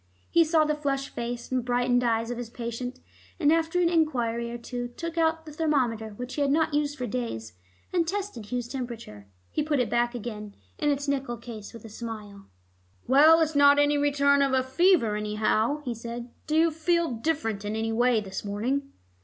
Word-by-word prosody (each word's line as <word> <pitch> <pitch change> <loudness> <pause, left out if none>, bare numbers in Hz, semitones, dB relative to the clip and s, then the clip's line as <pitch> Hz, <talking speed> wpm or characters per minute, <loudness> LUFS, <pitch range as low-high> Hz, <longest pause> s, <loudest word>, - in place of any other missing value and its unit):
He 335 - +6
saw 315 -1 +3
the 300 - +1
flushed 275 -2 -2
face 240 +1 -5
and 255 -1 0
brightened 245 0 +2
eyes 230 0 +1
of 245 - -4
his 240 -2 -5
patient, 240 +2 -5 0.4
and 305 -2 +4
after 330 +2 +1
an 350 - +4
enquiry 245 -9 +1
or 240 - -5
two 245 +1 -5
took 330 +7 -6
out 320 -1 +1
the 305 - -9
thermometer 250 -9 0
which 250 +3 -6
he 295 - -2
had 280 - +2
not 315 +1 +2
used 295 0 0
for 250 - -3
days, 230 - -4 0.4
and 340 -2 +2
tested 385 - -4
Hugh's 245 -1 -2
temperature. 235 - -7 0.2
He - - 0
put 295 -2 0
it 235 -4 0
back 240 +1 +1
again 210 -3 -6 0.2
in 295 - +1
its 285 0 -1
nickel 270 -4 -1
case 225 -3 -9
with 230 - -12
a - - -9
smile. 210 -3 -8 0.6
"Well, 310 +5 +7
it's 315 0 +1
not 285 0 +7
any 290 0 +4
return 280 0 +3
of 260 -2 +2
fever, 265 - +3
anyhow," 215 +6 0
he 245 - -1
said. 235 +1 -7 0.2
"Do 305 - 0
you 330 +1 +4
feel 335 +1 +1
different 225 -5 -2
in 205 +1 -3
any 225 0 -1
way 240 0 +3
this 190 -2 -6
morning?" 250 +8 -2
250 Hz, 195 wpm, -27 LUFS, 230-300 Hz, 0.6 s, Well